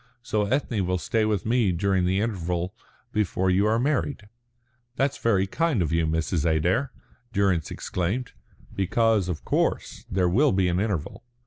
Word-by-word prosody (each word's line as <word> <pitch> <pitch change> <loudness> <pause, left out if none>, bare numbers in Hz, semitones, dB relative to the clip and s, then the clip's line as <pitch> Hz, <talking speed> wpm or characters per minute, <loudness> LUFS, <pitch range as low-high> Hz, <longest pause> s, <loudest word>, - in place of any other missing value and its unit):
So 105 -3 0
Ethne 120 -3 0
will 90 0 0
stay 110 +4 0
with 105 -3 -1
me 115 -3 +2
during 95 +1 +1
the 95 +2 +1
interval 90 -4 -2 0.4
before 95 -4 +1
you 100 +3 +3
are 110 +1 +2
married." 135 -3 -1 0.7
"That's 135 +1 0
very 100 -5 +2
kind 160 +4 0
of 80 - -2
you, 80 -1 +1
Mrs. 80 0 0
Adair," 85 - +1 0.4
Durrance 95 -6 +1
exclaimed; 100 +8 -3 0.4
"because, 105 0 +2
of 80 -4 -4
course, - - -1
there 90 -1 +1
will 130 +11 +3
be 95 -1 +2
an 90 +1 0
interval." 105 +1 -3
100 Hz, 155 wpm, -25 LUFS, 90-115 Hz, 0.7 s, you